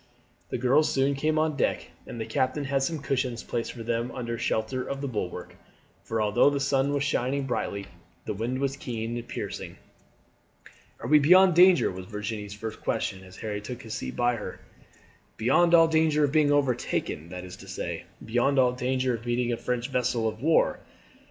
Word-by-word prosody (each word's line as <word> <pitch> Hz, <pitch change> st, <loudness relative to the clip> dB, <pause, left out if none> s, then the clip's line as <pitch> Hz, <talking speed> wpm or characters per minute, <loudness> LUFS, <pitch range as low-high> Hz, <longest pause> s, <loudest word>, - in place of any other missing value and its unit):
The -, -, -2 dB
girls 130 Hz, +5 st, +3 dB
soon 135 Hz, +1 st, +2 dB
came 155 Hz, +3 st, 0 dB
on 155 Hz, -1 st, +1 dB
deck, 140 Hz, -, -1 dB, 0.2 s
and 120 Hz, -, -7 dB
the 110 Hz, -, -2 dB
captain 130 Hz, +6 st, 0 dB
had 135 Hz, 0 st, 0 dB
some 150 Hz, +1 st, -2 dB
cushions 125 Hz, -3 st, -1 dB
placed 115 Hz, -1 st, -3 dB
for 115 Hz, -, -8 dB
them 115 Hz, +1 st, -1 dB
under 120 Hz, -2 st, -4 dB
shelter 115 Hz, +3 st, -1 dB
of 140 Hz, -, -4 dB
the 140 Hz, -, -3 dB
bulwark; 105 Hz, -8 st, -5 dB, 0.5 s
for 110 Hz, +3 st, -3 dB
although 105 Hz, +5 st, +4 dB
the 140 Hz, -1 st, -1 dB
sun 135 Hz, 0 st, +1 dB
was 140 Hz, -1 st, 0 dB
shining 140 Hz, -1 st, 0 dB
brightly 100 Hz, -5 st, -2 dB, 0.4 s
the -, -, -2 dB
wind 115 Hz, +5 st, -2 dB
was 135 Hz, 0 st, -1 dB
keen 115 Hz, -3 st, -4 dB
and 120 Hz, 0 st, -6 dB
piercing. -, -, -6 dB, 1.2 s
"Are -, -, -4 dB
we 150 Hz, 0 st, +6 dB
beyond 180 Hz, +5 st, +6 dB
danger?" 180 Hz, +2 st, +6 dB
was 90 Hz, 0 st, -8 dB
Virginie's 105 Hz, 0 st, -5 dB
first 110 Hz, +1 st, -7 dB
question 95 Hz, 0 st, -2 dB
as 95 Hz, 0 st, -14 dB
Harry 105 Hz, -2 st, -4 dB
took 125 Hz, +3 st, -7 dB
his 110 Hz, -1 st, -7 dB
seat 125 Hz, -, -5 dB
by 120 Hz, -1 st, +1 dB
her. 105 Hz, -, -7 dB, 0.8 s
"Beyond 170 Hz, +9 st, +4 dB
all 165 Hz, -1 st, +7 dB
danger 160 Hz, -2 st, +3 dB
of 145 Hz, -, +2 dB
being 150 Hz, -1 st, +3 dB
overtaken 125 Hz, -, 0 dB
that 90 Hz, 0 st, -7 dB
is 90 Hz, -, -9 dB
to -, -, -13 dB
say, -, -, -5 dB, 0.2 s
beyond 120 Hz, +5 st, +1 dB
all 125 Hz, -2 st, +5 dB
danger 130 Hz, 0 st, 0 dB
of 115 Hz, +1 st, -6 dB
meeting 120 Hz, 0 st, 0 dB
a -, -, -2 dB
French 125 Hz, 0 st, -2 dB
vessel 120 Hz, -2 st, 0 dB
of 110 Hz, +1 st, -4 dB
war. 160 Hz, +3 st, +3 dB
125 Hz, 190 wpm, -27 LUFS, 115-140 Hz, 1.2 s, all